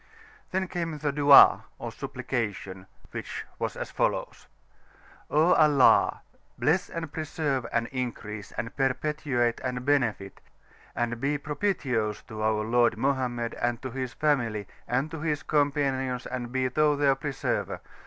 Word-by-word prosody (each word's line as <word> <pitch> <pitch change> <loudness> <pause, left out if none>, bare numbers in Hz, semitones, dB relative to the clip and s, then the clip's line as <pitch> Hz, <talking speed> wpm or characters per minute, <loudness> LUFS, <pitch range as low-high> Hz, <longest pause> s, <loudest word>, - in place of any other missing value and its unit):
Then 190 0 -1
came 170 -3 -3
the 145 -1 -1
Dua, 145 -1 +7
or - - -6
supplication, 95 -4 -4 0.2
which - - -6
was - - -3
as - - -5
follows: - - -2 0.8
"O 155 +4 +4
Allah! 150 -4 +5 0.4
bless 180 +5 +1
and 165 -3 -6
preserve, 145 -5 -2
and 115 0 +1
increase, 110 -5 -5
and 115 +1 -5
perpetuate, 135 -2 0
and 125 -1 -3
benefit, 120 -9 0 0.5
and 120 0 -2
be 145 +2 +1
propit[i]ous 140 - -1
to, 110 -1 -7
our 110 0 +1
Lord 120 0 +2
Mohammed, 125 -2 -1
and 120 -1 -1
to 130 - -4
his 130 0 -4
Family, 115 -9 0 0.2
and 130 +5 0
to 165 - -5
his 150 -2 -1
Companions, 135 -4 0
and 120 -2 -5
be 130 0 +1
Thou 150 +3 +2
their 140 -1 +3
Preserver! 135 +1 -2
130 Hz, 135 wpm, -27 LUFS, 120-150 Hz, 0.8 s, Dua